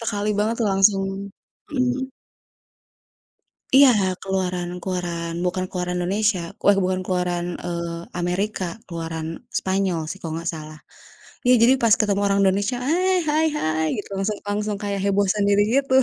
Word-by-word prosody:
sekali 210 Hz, -2 st, -2 dB
banget 215 Hz, +2 st, +1 dB
tuh 225 Hz, -, +2 dB
langsung 195 Hz, 0 st, +4 dB, 0.7 s
mhm. 260 Hz, -1 st, -1 dB, 1.7 s
Iya, 275 Hz, 0 st, +9 dB, 0.3 s
keluaran 185 Hz, -2 st, -2 dB
keluaran, 175 Hz, -2 st, -3 dB
bukan 185 Hz, +1 st, -1 dB
keluaran 180 Hz, -1 st, -3 dB
Indonesia 200 Hz, +2 st, +1 dB, 0.2 s
weh 200 Hz, -, +7 dB
bukan 185 Hz, 0 st, 0 dB
keluaran, 180 Hz, -1 st, -1 dB, 0.2 s
eee, 170 Hz, -1 st, -4 dB
Amerika, 185 Hz, +3 st, -1 dB, 0.2 s
keluaran 165 Hz, -2 st, -4 dB, 0.3 s
Spanyol 190 Hz, -3 st, 0 dB
sih 185 Hz, -, -5 dB
kalau 165 Hz, -, -5 dB
nggak 170 Hz, -, -4 dB
salah. 155 Hz, 0 st, -9 dB, 0.7 s
Iya, 250 Hz, -, +7 dB
jadi 245 Hz, +3 st, +6 dB
pas 225 Hz, -2 st, +6 dB
ketemu 205 Hz, -2 st, +1 dB
orang 200 Hz, 0 st, +2 dB
Indonesia, 200 Hz, +5 st, +1 dB
hai 365 Hz, +4 st, +2 dB
hai 310 Hz, +2 st, +3 dB
hai 155 Hz, -, 0 dB
gitu, 205 Hz, -, -6 dB
langsung 200 Hz, +2 st, -1 dB
langsung 210 Hz, +1 st, -1 dB
kayak 200 Hz, -1 st, -2 dB
heboh 200 Hz, 0 st, +2 dB
sendiri 205 Hz, 0 st, +3 dB, 0.2 s
gitu. 275 Hz, -1 st, -3 dB
195 Hz, 140 wpm, -23 LUFS, 175-210 Hz, 1.7 s, Iya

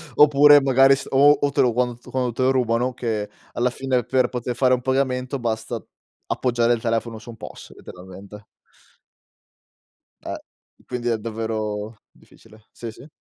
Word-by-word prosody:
oppure, 145 Hz, 0 st, +7 dB
magari, 135 Hz, 0 st, +5 dB
s -, -, -8 dB
o, 140 Hz, +2 st, +6 dB
o 145 Hz, -, 0 dB
te -, -, +2 dB
lo 120 Hz, -2 st, +2 dB
quant 120 Hz, 0 st, -2 dB
quando 125 Hz, -2 st, -1 dB
te 120 Hz, -, -5 dB
lo 130 Hz, +1 st, +3 dB
rubano 125 Hz, -1 st, 0 dB
che, 110 Hz, -4 st, -3 dB, 0.2 s
alla 125 Hz, +1 st, +1 dB
fine, 130 Hz, 0 st, -1 dB
per 130 Hz, +2 st, +1 dB
poter 125 Hz, -1 st, -4 dB
fare 130 Hz, 0 st, +3 dB
un 125 Hz, -, 0 dB
pagamento, 130 Hz, 0 st, -1 dB
basta 115 Hz, -1 st, -3 dB, 0.5 s
appoggiare 120 Hz, -1 st, +1 dB
il 115 Hz, -, -3 dB
telefono 115 Hz, -1 st, -2 dB
su 115 Hz, -, -14 dB
un 115 Hz, -, -10 dB
POS, -, -, -11 dB
letteralmente. 95 Hz, +3 st, -12 dB, 1.8 s
Eh, -, -, -5 dB, 0.5 s
quindi 125 Hz, -1 st, -4 dB
è 115 Hz, -, +1 dB
davvero 110 Hz, -1 st, -4 dB, 0.2 s
difficile. 110 Hz, -1 st, -21 dB
Sì, 115 Hz, -1 st, -8 dB
sì. 140 Hz, +7 st, -15 dB
120 Hz, 160 wpm, -22 LUFS, 110-130 Hz, 1.8 s, oppure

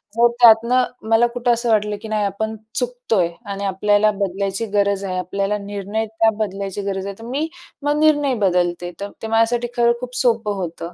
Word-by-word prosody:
जर 235 Hz, +1 st, +5 dB
त्यातनं 235 Hz, +2 st, +6 dB, 0.3 s
मला 225 Hz, +2 st, +5 dB
कुठं 240 Hz, 0 st, 0 dB
असं 235 Hz, 0 st, -2 dB
वाटलं, 210 Hz, -1 st, +2 dB
की 220 Hz, -, -7 dB
नाही 215 Hz, -1 st, 0 dB
आपण 220 Hz, +2 st, -3 dB, 0.2 s
चुकतोय 245 Hz, -8 st, 0 dB, 0.2 s
आणि 200 Hz, 0 st, -4 dB
आपल्याला 205 Hz, +2 st, +2 dB
बदलायची 195 Hz, +2 st, -1 dB
गरज 200 Hz, -1 st, +1 dB
आहे, 185 Hz, -1 st, -3 dB
आपल्याला 195 Hz, +3 st, -1 dB
निर्णय 205 Hz, +2 st, -3 dB
त्या 220 Hz, +1 st, +2 dB
बदलायची 200 Hz, -1 st, -3 dB
गरज 195 Hz, -1 st, -3 dB
आहे, 200 Hz, -, -5 dB
तर -, -, -10 dB
मी 280 Hz, +7 st, -2 dB, 0.4 s
मग 295 Hz, +1 st, +1 dB
निर्णय 295 Hz, -3 st, +3 dB
बदलते. 175 Hz, -1 st, 0 dB
तर 200 Hz, -, -4 dB
ते 225 Hz, -, -4 dB
माझ्यासाठी 230 Hz, +2 st, +2 dB
खरं 235 Hz, 0 st, +4 dB
खूप 250 Hz, 0 st, -6 dB
सोपं 225 Hz, -4 st, +1 dB
होतं. 170 Hz, -1 st, -5 dB
215 Hz, 180 wpm, -20 LUFS, 195-235 Hz, 0.4 s, त्यातनं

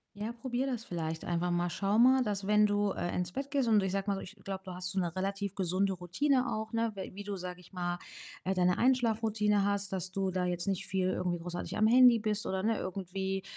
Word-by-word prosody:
Ja, 210 Hz, +3 st, -4 dB
probiere 255 Hz, +2 st, -2 dB
das 235 Hz, -2 st, -4 dB
vielleicht 160 Hz, -2 st, -4 dB
einfach 175 Hz, 0 st, 0 dB
mal. 175 Hz, 0 st, 0 dB
Schau 200 Hz, +3 st, 0 dB
mal, 260 Hz, +2 st, +6 dB
dass 200 Hz, -2 st, -2 dB
wenn 210 Hz, 0 st, +5 dB
du, 205 Hz, 0 st, +1 dB
äh, 175 Hz, -, -3 dB
ins 180 Hz, -1 st, -1 dB
Bett 275 Hz, +5 st, -4 dB
gehst 275 Hz, -4 st, +1 dB
und 215 Hz, -2 st, +5 dB
ich 190 Hz, -1 st, -1 dB
sage 195 Hz, +1 st, -2 dB
mal 195 Hz, -, +1 dB
so, -, -, -4 dB
ich 195 Hz, -, -10 dB
glaube, 190 Hz, 0 st, -5 dB
du 185 Hz, -, -7 dB
hast 180 Hz, 0 st, -5 dB
so 190 Hz, -, -3 dB
'ne 175 Hz, -2 st, -1 dB
relativ 195 Hz, +1 st, -2 dB
gesunde 190 Hz, +1 st, +1 dB
Routine 250 Hz, -, +1 dB
auch, 220 Hz, 0 st, -4 dB
ne? 230 Hz, 0 st, +1 dB
We 190 Hz, -, -6 dB
wie 200 Hz, -, -6 dB
du, 205 Hz, -1 st, -4 dB
sage 180 Hz, -1 st, -6 dB
ich 180 Hz, -, -18 dB
mal, 175 Hz, -1 st, -2 dB, 0.5 s
äh, 190 Hz, -, 0 dB
deine 180 Hz, -1 st, +2 dB
Einschlafroutine 220 Hz, -5 st, +2 dB
hast, 200 Hz, -1 st, -1 dB
dass 185 Hz, -1 st, -2 dB
du 195 Hz, -1 st, -1 dB
da 185 Hz, 0 st, -1 dB
jetzt 175 Hz, +1 st, -2 dB
nicht 195 Hz, -2 st, -1 dB
viel 185 Hz, 0 st, 0 dB
irgendwie 180 Hz, -1 st, -1 dB
großartig 175 Hz, +1 st, -5 dB
am 215 Hz, -, +4 dB
Handy 245 Hz, 0 st, +7 dB
bist 215 Hz, -1 st, -2 dB
oder, 190 Hz, 0 st, -1 dB
ne, 225 Hz, 0 st, +1 dB
irgendwie 190 Hz, +1 st, -3 dB
195 Hz, 245 wpm, -31 LUFS, 180-215 Hz, 0.5 s, Handy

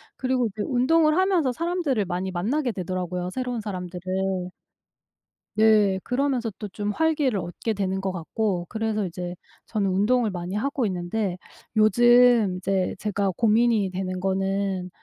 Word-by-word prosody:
그리고 255 Hz, -2 st, 0 dB
이제 215 Hz, 0 st, -6 dB
운동을 305 Hz, +5 st, +3 dB
하면서 370 Hz, -8 st, +2 dB
사람들을 325 Hz, -, -1 dB
많이 185 Hz, +1 st, -3 dB
만나게 240 Hz, +9 st, -1 dB
되더라고요 180 Hz, -1 st, -3 dB
새로운 250 Hz, -2 st, -3 dB
사람들을. 185 Hz, -1 st, -3 dB, 1.1 s
네. 210 Hz, -3 st, +4 dB
그러면서 250 Hz, -3 st, 0 dB
또 210 Hz, -, -4 dB
좀 205 Hz, +2 st, -3 dB
활기를 295 Hz, -4 st, +1 dB
얻게 175 Hz, +6 st, -3 dB
되는 190 Hz, -2 st, -1 dB
것 195 Hz, -1 st, -1 dB
같고 180 Hz, +1 st, -2 dB
그래서 220 Hz, -2 st, -1 dB
이제 175 Hz, +1 st, -6 dB, 0.3 s
저는 205 Hz, -3 st, -1 dB
운동을 215 Hz, +5 st, +2 dB
많이 180 Hz, +1 st, -5 dB
하고 265 Hz, +2 st, -1 dB
있는데 185 Hz, +1 st, -2 dB, 0.4 s
요즘 240 Hz, -1 st, +5 dB
이제 190 Hz, 0 st, -1 dB
제가 200 Hz, -2 st, -1 dB
고민이 225 Hz, -2 st, +3 dB
되는 185 Hz, 0 st, -3 dB
거는 190 Hz, 0 st, -1 dB
205 Hz, 315 characters per minute, -25 LUFS, 185-245 Hz, 1.1 s, 요즘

